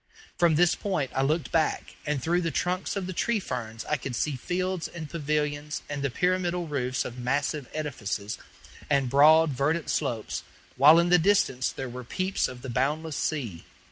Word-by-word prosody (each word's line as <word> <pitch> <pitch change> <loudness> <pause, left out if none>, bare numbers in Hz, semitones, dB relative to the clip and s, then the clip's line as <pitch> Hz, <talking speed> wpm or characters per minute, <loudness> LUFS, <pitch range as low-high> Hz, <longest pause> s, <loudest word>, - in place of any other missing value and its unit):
From 170 -3 +3
this 175 +2 +4
point 180 -10 -2
I 135 - +1
looked 155 +4 0
back, 160 -2 0
and 150 -1 0
through 175 +2 +2
the 165 - 0
trunks 180 +3 -1
of 195 -2 -2
the 185 - -4
tree 230 +5 +1
ferns 115 - -5
I 150 - 0
could 130 -2 -5
see 145 +4 0
fields 180 +5 -2
and 165 -3 -7
pavilions 150 -1 -2
and 145 -1 -4
the 140 - 0
pyramidal 180 +4 0
roofs 130 -3 -1
of 125 +1 -7
massive 140 +2 -1
edifices, 120 -8 -4 0.5
and 135 -4 +2
broad, 155 +3 +6
verdant 150 +5 0
slopes, 120 -7 -2 0.3
while 145 +5 +8
in 170 +1 +3
the 180 0 +6
distance 165 -9 +2
there 135 - -5
were 125 +1 -7
peeps 185 +10 -1
of 125 -1 -10
the 135 - -5
boundless 150 +5 -1
sea. 120 - -2
150 Hz, 180 wpm, -27 LUFS, 130-170 Hz, 0.5 s, while